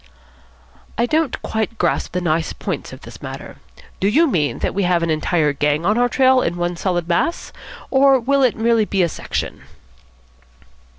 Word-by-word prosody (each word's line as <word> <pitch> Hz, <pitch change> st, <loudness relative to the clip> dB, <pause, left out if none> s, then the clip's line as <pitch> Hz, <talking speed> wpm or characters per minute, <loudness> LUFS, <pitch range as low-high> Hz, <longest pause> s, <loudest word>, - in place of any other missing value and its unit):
"I 235 Hz, -, +2 dB
don't 310 Hz, +1 st, 0 dB
quite 220 Hz, +1 st, -2 dB
grasp 175 Hz, -2 st, -1 dB
the 180 Hz, -, -1 dB
nice 165 Hz, -1 st, 0 dB
points -, -, -5 dB
of -, -, -11 dB
this -, -, -12 dB
matter. -, -, -8 dB, 0.4 s
Do 195 Hz, -, +1 dB
you 300 Hz, +11 st, +4 dB
mean 160 Hz, -, 0 dB
that -, -, -2 dB
we 200 Hz, -, -1 dB
have 175 Hz, -2 st, +1 dB
an 165 Hz, -, 0 dB
entire 155 Hz, -1 st, +1 dB
gang 150 Hz, +3 st, 0 dB
on 210 Hz, +3 st, +3 dB
our 245 Hz, +1 st, +2 dB
trail 260 Hz, 0 st, +4 dB
in 175 Hz, -4 st, -2 dB
one 175 Hz, 0 st, -1 dB
solid 175 Hz, -1 st, -2 dB
mass, 175 Hz, -, -1 dB, 0.4 s
or 270 Hz, 0 st, +5 dB
will 275 Hz, +4 st, +1 dB
it 255 Hz, -4 st, +2 dB
be 225 Hz, -, -5 dB
merely 230 Hz, -2 st, +2 dB
a -, -, +3 dB
section?" -, -, -5 dB
195 Hz, 180 wpm, -19 LUFS, 170-250 Hz, 0.4 s, or